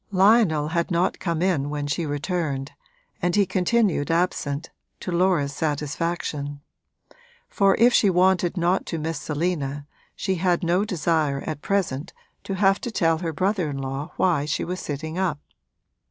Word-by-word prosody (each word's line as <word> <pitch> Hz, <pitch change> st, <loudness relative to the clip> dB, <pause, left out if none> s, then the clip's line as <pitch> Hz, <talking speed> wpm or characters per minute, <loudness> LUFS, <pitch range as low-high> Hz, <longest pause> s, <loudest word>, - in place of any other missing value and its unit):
Lionel 190 Hz, -6 st, +4 dB
had 170 Hz, +1 st, 0 dB
not 175 Hz, 0 st, +1 dB
come 170 Hz, -2 st, -1 dB
in 155 Hz, -7 st, +1 dB
when 145 Hz, -1 st, -3 dB
she 150 Hz, +3 st, -2 dB
returned, 145 Hz, -2 st, -2 dB, 0.5 s
and 175 Hz, 0 st, +1 dB
he 205 Hz, -1 st, +4 dB
continued 185 Hz, -3 st, +1 dB
absent, 165 Hz, -3 st, -1 dB, 0.3 s
to 180 Hz, -, -5 dB
Laura's 170 Hz, -5 st, +2 dB
satisfaction; 150 Hz, -1 st, -2 dB, 0.9 s
for 195 Hz, -1 st, +3 dB
if 240 Hz, +2 st, +5 dB
she 205 Hz, -, +5 dB
wanted 180 Hz, 0 st, +2 dB
not 175 Hz, +2 st, +1 dB
to 165 Hz, -, -3 dB
miss 160 Hz, -1 st, -3 dB
Selina 145 Hz, -3 st, -2 dB, 0.3 s
she 190 Hz, -, -1 dB
had 180 Hz, +1 st, +1 dB
no 175 Hz, +3 st, +2 dB
desire 155 Hz, -6 st, 0 dB
at 155 Hz, -2 st, -4 dB
present 180 Hz, -6 st, -1 dB, 0.3 s
to 195 Hz, -, -3 dB
have 195 Hz, 0 st, +3 dB
to -, -, -3 dB
tell 165 Hz, -7 st, +1 dB
her 165 Hz, -2 st, -2 dB
brother 185 Hz, 0 st, 0 dB
in 140 Hz, -, -4 dB
law 135 Hz, +3 st, -4 dB
why 165 Hz, -6 st, +2 dB
she 150 Hz, -, -1 dB
was 180 Hz, +1 st, -4 dB
sitting 155 Hz, +4 st, -4 dB
up. 180 Hz, -6 st, 0 dB
170 Hz, 155 wpm, -24 LUFS, 150-185 Hz, 0.9 s, if